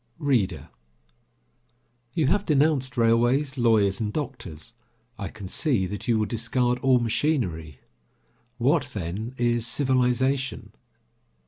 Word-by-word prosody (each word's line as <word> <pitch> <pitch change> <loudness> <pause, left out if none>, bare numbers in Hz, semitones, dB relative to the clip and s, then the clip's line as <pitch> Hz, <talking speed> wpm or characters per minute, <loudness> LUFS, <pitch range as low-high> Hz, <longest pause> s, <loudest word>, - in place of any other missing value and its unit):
READER: 120 - 0 1.5
You 160 - +2
have 205 +9 +2
denounced 140 -6 +1
railways, 120 +5 +2
lawyers 110 -6 +3
and 105 -2 -2
doctors. 115 - -6 0.5
I 100 - -3
can 100 -1 -9
see 120 - 0
that 105 +4 -6
you 115 -2 +3
will 110 - +1
discard 120 +3 0
all 130 0 +4
machinery. 110 - -1 0.8
What, 140 +4 +1
then, 105 +7 -4
is 120 -1 +1
civilization? 130 -2 0
120 Hz, 110 wpm, -25 LUFS, 105-135 Hz, 1.5 s, all